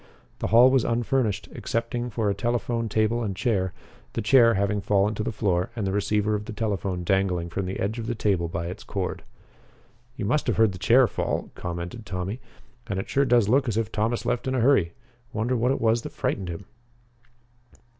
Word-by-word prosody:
The -, -, -1 dB
hall 120 Hz, +3 st, +7 dB
was 130 Hz, -3 st, +3 dB
unfurnished, 115 Hz, -2 st, 0 dB
excepting 120 Hz, +1 st, -2 dB
for 110 Hz, -1 st, -1 dB
a 100 Hz, -, +2 dB
telephone 115 Hz, +1 st, -1 dB
table 110 Hz, +3 st, +1 dB
and 100 Hz, -4 st, -2 dB
chair, 95 Hz, -5 st, 0 dB, 0.4 s
the -, -, -2 dB
chair 115 Hz, -1 st, +6 dB
having 100 Hz, +1 st, 0 dB
fallen 100 Hz, +1 st, +2 dB
to 105 Hz, -, -4 dB
the 110 Hz, -, -2 dB
floor 95 Hz, -4 st, 0 dB
and 110 Hz, -4 st, -2 dB
the 95 Hz, -, 0 dB
receiver 105 Hz, +1 st, +1 dB
of 105 Hz, 0 st, -2 dB
the 115 Hz, -, -6 dB
telephone 100 Hz, -4 st, -2 dB
dangling 90 Hz, -2 st, 0 dB
from 95 Hz, +1 st, -2 dB
the 95 Hz, -, -4 dB
edge 110 Hz, +4 st, -2 dB
of 115 Hz, -, -5 dB
the 120 Hz, -, -1 dB
table 95 Hz, -6 st, +1 dB
by 85 Hz, 0 st, -4 dB
its 90 Hz, +2 st, -6 dB
cord. -, -, -3 dB, 0.9 s
"You 120 Hz, -, -4 dB
must 140 Hz, +8 st, +1 dB
have -, -, +1 dB
heard 110 Hz, -2 st, +4 dB
the 90 Hz, -, -9 dB
chair 120 Hz, +7 st, +5 dB
fall," -, -, -2 dB
commented 85 Hz, +5 st, -6 dB
Tommy, 95 Hz, +6 st, -4 dB, 0.5 s
"and 100 Hz, -4 st, -3 dB
it 95 Hz, -, -4 dB
sure 140 Hz, +1 st, +3 dB
does 120 Hz, -5 st, +4 dB
look 130 Hz, +4 st, +3 dB
as 110 Hz, -2 st, -1 dB
if 115 Hz, -1 st, -1 dB
Thomas 115 Hz, +3 st, -1 dB
left 120 Hz, -, -1 dB
in 130 Hz, -, 0 dB
a -, -, +1 dB
hurry. 115 Hz, -9 st, +3 dB, 0.4 s
Wonder 115 Hz, +3 st, 0 dB
what 120 Hz, +1 st, +1 dB
it 135 Hz, -, +1 dB
was 115 Hz, +1 st, +2 dB
that -, -, -8 dB
frightened 95 Hz, -2 st, -2 dB
him?" 85 Hz, +3 st, -6 dB
110 Hz, 205 wpm, -25 LUFS, 95-120 Hz, 0.9 s, hall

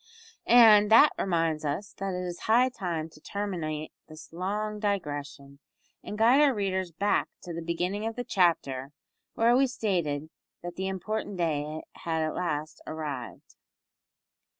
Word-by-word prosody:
And 220 Hz, -3 st, +7 dB
that 230 Hz, +7 st, +7 dB
reminds 165 Hz, -4 st, 0 dB
us 150 Hz, +8 st, -3 dB
that 195 Hz, -1 st, -2 dB
it 180 Hz, 0 st, -3 dB
is 175 Hz, -1 st, -5 dB
high 245 Hz, +3 st, +5 dB
time 175 Hz, -9 st, -4 dB
to 150 Hz, -, -17 dB
terminate 165 Hz, -7 st, -4 dB, 0.2 s
this 155 Hz, +1 st, -12 dB
long 210 Hz, +4 st, -3 dB
digression, 145 Hz, -8 st, -4 dB, 0.4 s
and 210 Hz, -, -6 dB
guide 240 Hz, +6 st, +5 dB
our 280 Hz, -4 st, +4 dB
readers 190 Hz, -3 st, -1 dB
back 200 Hz, +6 st, 0 dB
to 175 Hz, -, -6 dB
the 170 Hz, -, -5 dB
beginning 180 Hz, +6 st, -2 dB
of 225 Hz, -, -4 dB
the 245 Hz, -, -3 dB
chapter, 160 Hz, -, 0 dB, 0.4 s
where 235 Hz, +2 st, +4 dB
we 270 Hz, +1 st, +4 dB
stated 165 Hz, -, -2 dB, 0.3 s
that 175 Hz, 0 st, -6 dB
the 190 Hz, 0 st, -3 dB
important 195 Hz, +1 st, -3 dB
day 155 Hz, -2 st, -2 dB
had 160 Hz, -1 st, -2 dB
at 155 Hz, -, -2 dB
last 155 Hz, -3 st, -3 dB
arrived. 150 Hz, -6 st, -6 dB
180 Hz, 150 wpm, -28 LUFS, 155-210 Hz, 0.4 s, And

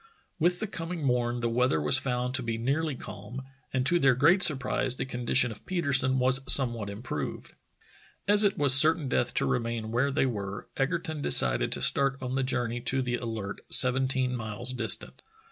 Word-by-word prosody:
With 175 Hz, +2 st, 0 dB
the -, -, -3 dB
coming 165 Hz, -4 st, -7 dB
morn 120 Hz, -2 st, -1 dB
the 120 Hz, -, -1 dB
weather 125 Hz, -7 st, 0 dB
was 75 Hz, -1 st, +3 dB
found 125 Hz, -1 st, -3 dB
to 130 Hz, -, 0 dB
be 115 Hz, -2 st, -4 dB
nearly 140 Hz, +5 st, -2 dB
calm, 120 Hz, +3 st, -9 dB, 0.3 s
and 130 Hz, -1 st, -2 dB
to 175 Hz, +4 st, +2 dB
their 135 Hz, -5 st, +3 dB
great 165 Hz, +9 st, +3 dB
surprise 135 Hz, -4 st, 0 dB
the -, -, -3 dB
condi 125 Hz, -2 st, -5 dB
tion 125 Hz, -2 st, +3 dB
of 105 Hz, -, -11 dB
Petersen 140 Hz, -7 st, 0 dB
was 130 Hz, +1 st, +2 dB
somewhat 120 Hz, -6 st, +4 dB
improved. 100 Hz, -, -7 dB, 0.7 s
As 205 Hz, +1 st, +5 dB
it 200 Hz, -1 st, +1 dB
was 145 Hz, -2 st, +4 dB
certain 155 Hz, +1 st, +4 dB
death 125 Hz, -1 st, -1 dB
to -, -, 0 dB
remain 115 Hz, -2 st, -3 dB
where 125 Hz, +4 st, 0 dB
they 140 Hz, 0 st, 0 dB
were, 100 Hz, -5 st, -5 dB
Egerton 155 Hz, +2 st, -3 dB
decided -, -, +2 dB
to -, -, -3 dB
start 140 Hz, -1 st, +1 dB
on 130 Hz, -1 st, -6 dB
the 135 Hz, -, -1 dB
journey 120 Hz, -2 st, -2 dB
to 130 Hz, +1 st, 0 dB
the 120 Hz, -1 st, -3 dB
Alert, 110 Hz, -5 st, -6 dB
seventeen 130 Hz, 0 st, +5 dB
miles 115 Hz, +2 st, -6 dB
distant. 120 Hz, -3 st, -2 dB
130 Hz, 185 wpm, -27 LUFS, 120-140 Hz, 0.7 s, As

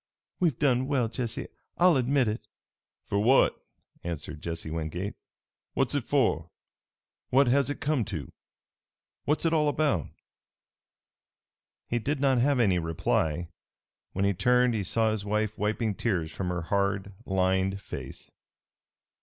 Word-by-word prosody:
We've 165 Hz, -9 st, +2 dB
done 130 Hz, -3 st, +2 dB
well, 130 Hz, -5 st, +1 dB
Jesse, 120 Hz, -1 st, -4 dB, 0.3 s
I'll 180 Hz, -1 st, +5 dB
admit 130 Hz, 0 st, +2 dB
it." 105 Hz, 0 st, -3 dB, 0.6 s
"For 100 Hz, -, 0 dB
what?" 125 Hz, +6 st, +4 dB, 0.4 s
answered 80 Hz, -2 st, -5 dB
Jesse 80 Hz, -1 st, -4 dB
Wingate. 85 Hz, +5 st, -3 dB, 0.6 s
"What's -, -, +1 dB
it -, -, -1 dB
for? 80 Hz, +2 st, +1 dB, 0.8 s
What 135 Hz, +2 st, +5 dB
has 140 Hz, +3 st, +3 dB
it 145 Hz, -, -3 dB
come 145 Hz, -5 st, +1 dB
to? 80 Hz, -8 st, -5 dB, 0.9 s
What's 150 Hz, +4 st, +1 dB
it 165 Hz, -, +3 dB
all 150 Hz, -2 st, +3 dB
about?" 145 Hz, -, +1 dB, 1.8 s
He 120 Hz, -, 0 dB
did 145 Hz, +5 st, -1 dB
not 135 Hz, -2 st, +3 dB
have 135 Hz, +1 st, +3 dB
any 95 Hz, -6 st, +3 dB
reply. 80 Hz, 0 st, 0 dB, 0.6 s
When 100 Hz, +1 st, 0 dB
he 100 Hz, -, +3 dB
turned 125 Hz, +4 st, +3 dB
he 105 Hz, -3 st, -1 dB
saw 110 Hz, +4 st, +2 dB
his 110 Hz, -2 st, -2 dB
wife 105 Hz, +1 st, -1 dB
wiping 110 Hz, +1 st, 0 dB
tears 90 Hz, -7 st, -1 dB
from 90 Hz, -2 st, -3 dB
her 90 Hz, -1 st, -2 dB
hard, 100 Hz, +1 st, 0 dB
lined 95 Hz, 0 st, +1 dB
face. -, -, -8 dB
110 Hz, 135 wpm, -28 LUFS, 95-130 Hz, 1.8 s, I'll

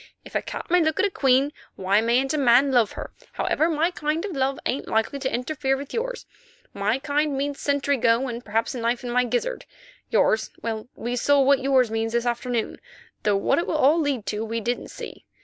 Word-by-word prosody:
If -, -, -12 dB
a -, -, 0 dB
cat -, -, -7 dB
may 360 Hz, 0 st, +5 dB
look 315 Hz, -1 st, 0 dB
at -, -, +4 dB
a 400 Hz, -, 0 dB
queen, 270 Hz, -1 st, +2 dB, 0.2 s
why 195 Hz, +3 st, +2 dB
mayn't 245 Hz, +5 st, +1 dB
a -, -, 0 dB
man 265 Hz, +1 st, +5 dB
love 240 Hz, -5 st, +3 dB
her? -, -, -7 dB, 0.2 s
Howsoever, 320 Hz, +2 st, +1 dB
my 325 Hz, +2 st, +1 dB
kind 310 Hz, +1 st, -2 dB
of 410 Hz, -, -4 dB
love 270 Hz, 0 st, 0 dB
ain't 265 Hz, -, -2 dB
likely 225 Hz, +5 st, 0 dB
to 265 Hz, -1 st, -2 dB
interfere 270 Hz, +1 st, -1 dB
with 280 Hz, 0 st, -8 dB
yours. -, -, -3 dB, 0.5 s
My 210 Hz, +5 st, 0 dB
kind 290 Hz, 0 st, 0 dB
means 280 Hz, +1 st, -2 dB
sentry 285 Hz, 0 st, +1 dB
go 235 Hz, +2 st, +2 dB
and 240 Hz, -1 st, -5 dB
perhaps 220 Hz, +2 st, -1 dB
a 250 Hz, -, -5 dB
knife 235 Hz, +1 st, -1 dB
in 245 Hz, -, -4 dB
my 250 Hz, +1 st, +2 dB
gizzard; -, -, -2 dB, 0.4 s
yours—well, 220 Hz, 0 st, 0 dB
we 240 Hz, +1 st, -3 dB
saw 285 Hz, +4 st, +3 dB
what 275 Hz, 0 st, +4 dB
yours 260 Hz, -3 st, +2 dB
means 225 Hz, 0 st, -1 dB
this 235 Hz, 0 st, 0 dB
afternoon, 240 Hz, -1 st, -2 dB, 0.4 s
though 205 Hz, -2 st, +2 dB
what 200 Hz, -, +2 dB
it 340 Hz, -, -2 dB
will 315 Hz, -, 0 dB
all 305 Hz, +3 st, +4 dB
lead 280 Hz, -8 st, -1 dB
to 210 Hz, +1 st, -2 dB
we 225 Hz, +1 st, -3 dB
didn't 240 Hz, +3 st, -3 dB
see. -, -, -10 dB
265 Hz, 215 wpm, -24 LUFS, 235-285 Hz, 0.5 s, may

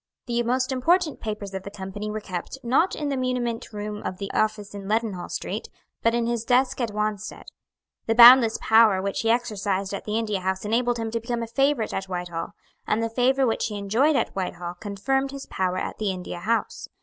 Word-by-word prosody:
The 240 Hz, -1 st, 0 dB
most 255 Hz, +2 st, 0 dB
important 320 Hz, +5 st, +2 dB
papers 210 Hz, -2 st, -5 dB
of 190 Hz, -, -4 dB
the 200 Hz, -, -8 dB
Company 205 Hz, +1 st, -6 dB
were 215 Hz, +1 st, -3 dB
kept, 185 Hz, +3 st, -6 dB
not 265 Hz, +10 st, +2 dB
in 295 Hz, -2 st, -3 dB
the 275 Hz, -, -1 dB
muniment 250 Hz, -3 st, -2 dB
room 210 Hz, 0 st, -5 dB
of 185 Hz, -, -4 dB
the 195 Hz, 0 st, -5 dB
office 215 Hz, -2 st, -1 dB
in 200 Hz, -1 st, -7 dB
Leadenhall 210 Hz, -4 st, -1 dB
Street, -, -, -4 dB, 0.3 s
but 230 Hz, +1 st, +2 dB
in 235 Hz, -1 st, +1 dB
his 235 Hz, -1 st, -1 dB
desk 255 Hz, +2 st, +2 dB
at 235 Hz, -, 0 dB
Wanstead. 210 Hz, -1 st, -3 dB, 0.6 s
The 225 Hz, -, +2 dB
boundless 240 Hz, -1 st, +9 dB
power 220 Hz, -3 st, +5 dB
which 195 Hz, +1 st, -2 dB
he 225 Hz, -, 0 dB
exercised 205 Hz, -5 st, 0 dB
at 200 Hz, -, -5 dB
the 210 Hz, +1 st, -1 dB
India 210 Hz, -3 st, -1 dB
House 190 Hz, +2 st, -2 dB
enabled 240 Hz, +3 st, +1 dB
him 225 Hz, -1 st, -3 dB
to 230 Hz, -, -1 dB
become 235 Hz, 0 st, -3 dB
a -, -, -5 dB
favourite 270 Hz, -1 st, +1 dB
at 190 Hz, -, -2 dB
Whitehall; 175 Hz, -2 st, -4 dB, 0.3 s
and 225 Hz, +2 st, +1 dB
the 230 Hz, -, -2 dB
favour 260 Hz, +3 st, +2 dB
which 225 Hz, -, 0 dB
he 210 Hz, -2 st, -5 dB
enjoyed 230 Hz, +10 st, +2 dB
at -, -, 0 dB
Whitehall 175 Hz, -2 st, -4 dB
confirmed 270 Hz, +7 st, -1 dB
his 275 Hz, 0 st, -7 dB
power 185 Hz, -1 st, -1 dB
at -, -, -4 dB
the 210 Hz, -2 st, 0 dB
India 180 Hz, -2 st, -5 dB
House. 225 Hz, +6 st, -2 dB
220 Hz, 210 wpm, -25 LUFS, 200-245 Hz, 0.6 s, boundless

